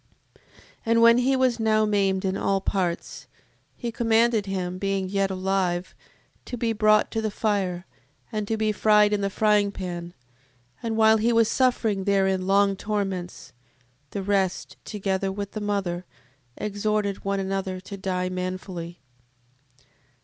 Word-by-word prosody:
7:6. - - -33 0.5
And 230 0 +4
when 235 0 +7
he 265 +2 +2
was 255 -2 +2
now 215 -1 +3
maimed 195 -2 +1
in 190 0 0
all 195 0 +1
parts, 180 -3 -3 0.5
he 235 - -4
commanded 225 -2 +2
him, 185 -1 -3
being 195 -1 -1
yet 195 0 0
alive, 185 -1 -1 0.5
to 245 - -5
be 230 -1 0
brought 215 0 +3
to 225 - -1
the 220 - -1
fire, 195 -4 -1 0.5
and 215 -2 -3
to 225 - -1
be 215 0 +1
fried 210 0 +4
in 205 - 0
the 200 - 0
fryingpan: 195 -5 0 0.7
and 225 -1 -2
while 220 0 +6
he 225 +2 +2
was 230 -1 +4
suffering 225 -7 +1
therein 190 -2 +1
long 200 0 +3
torments, 195 -3 -4 0.6
the 200 - -4
rest, 190 -2 -1
together 195 -2 -2
with 200 0 -5
the 215 - -5
mother, 190 -4 -2 0.5
exhorted 210 -1 -1
one 195 0 -1
another 190 -1 -2
to 200 +2 -8
die 185 -2 -2
manfully, 185 -1 -5 0.8
7:6. 130 - -30
200 Hz, 150 wpm, -25 LUFS, 190-215 Hz, 0.8 s, when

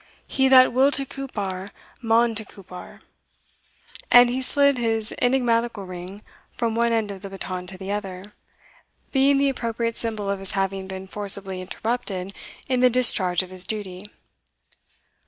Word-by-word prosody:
He 265 -1 +1
that 255 -2 +7
will 265 +3 +5
to 275 +1 +1
Cupar 205 -9 -5 0.3
maun 230 0 +3
to 220 0 -3
Cupar," 185 -3 -12 1.1
and 245 0 +7
he 260 +1 -2
slid 280 0 +2
his 225 -1 -1
enigmatical 240 -4 +1
ring 185 +3 -8 0.3
from 230 -1 -1
one 235 +1 +2
end 220 -3 0
of 195 -1 -9
the 200 - -7
baton 185 -2 -5
to 190 0 -9
the 190 +1 -6
other, 200 -1 -5 0.8
being 275 +1 +4
the 280 0 +3
appropriate 230 -2 -2
symbol 220 -3 -3
of 200 0 -1
his 195 -1 -6
having 195 -1 -2
been 190 0 -7
forcibly 195 -1 -1
interrupted 195 -1 -3 0.3
in 255 -1 +1
the 250 0 +6
discharge 190 -8 +3
of 185 - -12
his 185 -1 -2
duty. 195 -2 -5
215 Hz, 155 wpm, -24 LUFS, 190-245 Hz, 1.1 s, that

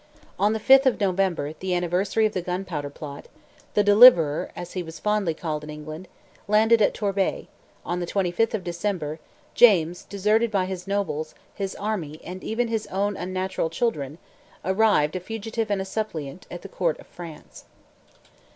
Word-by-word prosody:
On 205 +2 +3
the 220 - -1
5th 270 +4 +6
of 255 - +2
November, 185 -6 0
the 185 +2 -2
anniversary 180 +5 +1
of 215 - 0
the 185 - -1
gunpowder 180 -5 -4
plot, 145 0 -9 0.5
"the 210 - +4
Deliverer," 205 -8 +7
as 175 0 -7
he 185 - -2
was 160 -1 -8
fondly 210 -6 0
called 155 -2 -4
in 150 - -9
England, 155 +4 -8 0.4
landed 220 +2 +4
at 205 - +3
Torbay; 200 -2 -1 0.4
on 175 +1 -2
the 175 - -3
25th 195 +5 0
of 200 - -4
December, 170 -3 -3 0.3
James, 180 -7 +5
deserted 210 +4 +1
by 195 -3 +1
his 185 0 -6
nobles, 195 -6 -2 0.2
his 195 -1 -4
army, 180 -8 -4
and 185 +2 -8
even 235 +2 -1
his 225 -2 -2
own 200 +2 -1
unnatural 185 -2 -2
children, 155 - -2 0.5
arrived, 190 -6 +3
a - - -1
fugitive 225 +3 -4
and 200 -2 0
a - - -9
suppliant, 180 -7 -5
at 175 - -8
the - - -7
court 170 -4 -1
of - - -13
France. 165 -3 -11
190 Hz, 170 wpm, -25 LUFS, 165-210 Hz, 0.5 s, Deliverer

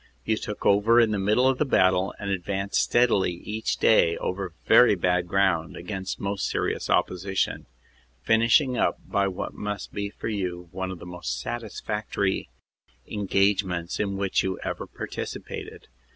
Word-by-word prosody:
You 110 - +2
took 105 -1 -6
over 105 +4 +5
in 115 -2 +4
the 105 - 0
middle 105 +6 +3
of 130 -1 +1
the - - +4
battle 95 -8 +2
and 100 -1 -4
advanced 95 +1 -1
steadily 115 -7 +3
each 105 +5 -3
day 85 -6 +4
over 95 -2 -4
very - - +6
bad 90 -1 +1
ground 95 -4 +1
against 95 +1 -5
most 100 0 -2
serious - - -2
opposition, 95 +1 0 0.6
finishing 115 +4 +4
up - - +2
by 100 0 +1
what 95 - -4
must 105 -2 -5
be 100 0 -3
for - - -7
you 90 -5 -3
one 95 0 -4
of 95 - -6
the 85 - -11
most 90 -8 -4
satisfactory 105 - -3 0.6
engagements 95 -3 0
in 100 -2 -1
which 100 -1 +1
you 95 -1 -2
ever - - -4
partici - - -6
pated. - - -8
100 Hz, 155 wpm, -26 LUFS, 90-105 Hz, 0.6 s, very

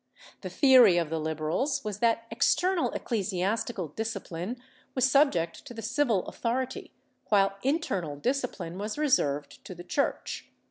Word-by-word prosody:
The - - -5
theory 255 - +6
of 165 -3 0
the 165 - -1
Liberals 160 - -1
was 210 -1 -4
that 230 0 +2
external 345 +9 +2
ecclesiastical 200 - -2
discipline 200 - -4 0.4
was 255 0 +4
subject 260 - +2
to 245 - -9
the 225 - -7
civil 235 -4 +1
authority, 250 +2 -3 0.4
while 195 -1 +3
internal 200 - -1
discipline 215 - -3
was 210 +4 -4
reserved 145 - 0
to 185 - -9
the 175 - -9
Church. 280 +10 -2
220 Hz, 135 wpm, -28 LUFS, 175-260 Hz, 0.4 s, theory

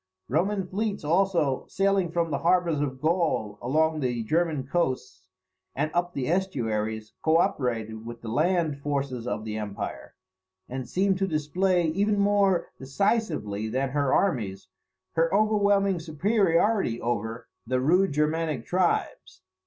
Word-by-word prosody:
Roman 190 - 0
fleets 205 +1 -3
also, 170 -4 +1
sailing 195 -2 +1
from 170 -1 0
the 140 - -1
harbours 170 -3 +2
of 130 -3 -3
Gaul 155 - 0
along 155 +5 +1
the 120 -4 -1
German 155 +1 0
coasts, 130 - -2 0.5
and 150 +3 -1
up 175 0 -1
the 130 -2 -2
estuaries, 110 - -1
co 160 0 +4
operated 110 -8 -1
with 120 0 -8
the - - -7
land 155 +4 +1
forces 140 -4 -3
of 110 -3 -3
the 110 -1 -4
empire; 105 -2 -6 0.5
and 130 -1 -6
seemed 190 +3 +1
to 195 - +1
display, 175 +3 +1
even 205 +5 +1
more 200 -3 +2
decisively 140 - -1
than 130 +4 -1
her 140 0 0
armies, 105 - 0 0.4
her 165 0 +1
overwhelming 200 -2 +3
superiority 175 - +1
over 115 -1 -3 0.2
the 130 +1 +1
rude 180 +8 +3
Germanic 150 -3 0
tribes. 175 - -1
155 Hz, 135 wpm, -26 LUFS, 125-185 Hz, 0.5 s, co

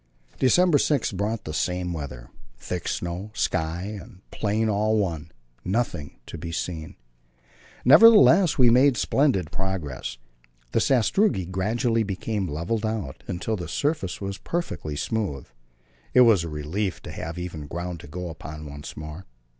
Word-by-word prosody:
December 165 +3 +4
6 145 -4 +1
brought 105 +3 -2
the 75 - -6
same 90 +2 -1
weather: 65 -6 -7 0.3
thick 90 +6 -5
snow, 90 +4 -3
sky 80 -2 -1 0.2
and 100 -6 -15
plain 110 +1 0
all 110 +1 +2
one, 80 -6 -2 0.3
nothing 95 - -2
to - - -8
be 85 - -5
seen. 80 -2 -4 0.9
Nevertheless 195 - +7
we 125 -3 +6
made 130 +1 +5
splendid 115 - +1
progress. 95 -11 -4 0.5
The - - +2
sastrugi 135 - +2
gradually 115 +6 0
became 100 0 -2
levelled 85 +9 -2
out, 110 -11 -3
until 95 +5 -2
the 90 -5 -5
surface 140 - -1
was 100 -1 -5
perfectly 165 - -3
smooth; 80 - -2 0.7
it 125 - +8
was 110 -8 +6
a 85 - -4
relief 80 +6 -3
to - - -7
have 80 +1 -6
even 85 -4 -6
ground 85 +2 -5
to - - -11
go 90 +3 -5
upon 75 -1 -8
once 70 0 -9
more. 75 +4 -8
95 Hz, 145 wpm, -25 LUFS, 80-115 Hz, 0.9 s, it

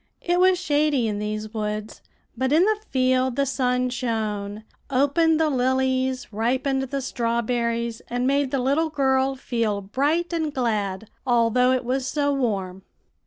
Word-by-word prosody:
"It 350 +1 +1
was 370 0 +5
shady 295 -7 +1
in 205 -1 -2
these 215 +1 -4
woods, 215 -1 -4 0.3
but 260 +2 -1
in 320 +4 +5
the 430 0 +1
field 255 -1 +2
the 280 +1 +1
sun 250 -2 0
shone, 215 -4 -3 0.3
opened 295 +4 +3
the 320 - +3
lilies, 260 -1 0
ripened 260 +5 0
the 270 +1 -3
strawberries, 235 -1 -1
and 245 +1 -2
made 280 0 +2
the 275 - -1
little 280 +6 +1
girl 270 -2 +1
feel 230 -5 -1
bright 290 - -1
and 320 -2 -1
glad, 215 -6 -2 0.2
although 245 0 +3
it 255 -2 0
was 260 +1 -1
so 285 0 0
warm. 195 -8 -2
255 Hz, 150 wpm, -24 LUFS, 230-275 Hz, 0.3 s, was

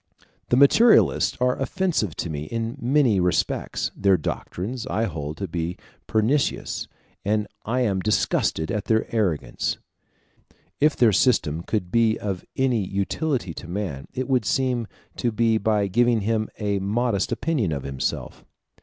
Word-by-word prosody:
The 120 - +3
materialists 220 - +5
are 125 0 +2
offensive 175 - 0
to 85 - -3
me 75 0 -4
in 115 - -3
many 125 -5 +3
respects; 90 -1 0
their 95 -2 +3
doctrines 110 - -4
I 110 -3 0
hold 80 -6 -4
to 100 - -3
be 85 +1 -3 0.3
pernicious, 115 +7 0 0.4
and 105 +1 +1 0.2
I 125 +4 0
am 100 -6 +1
disgusted 95 -5 0
at 105 - -2
their 110 0 +2
arrogance. 75 - -1 1.0
If 150 +1 +3
their 115 -4 +4
system 90 - +2
could 90 -1 -3
be 115 0 +3
of 95 -3 -4
any 125 -5 +1
utility 100 - -2
to - - -9
man, 85 -7 -4
it 130 0 -3
would 130 -4 +2
seem 125 0 0 0.3
to 120 - 0
be 115 0 +2
by 105 -1 +1
giving 120 +3 +2
him 110 +1 0
a 100 -2 -1
modest 105 +1 0
opinion 140 - 0
of 70 -3 -3
himself. 70 -1 -4
110 Hz, 145 wpm, -24 LUFS, 90-120 Hz, 1.0 s, materialists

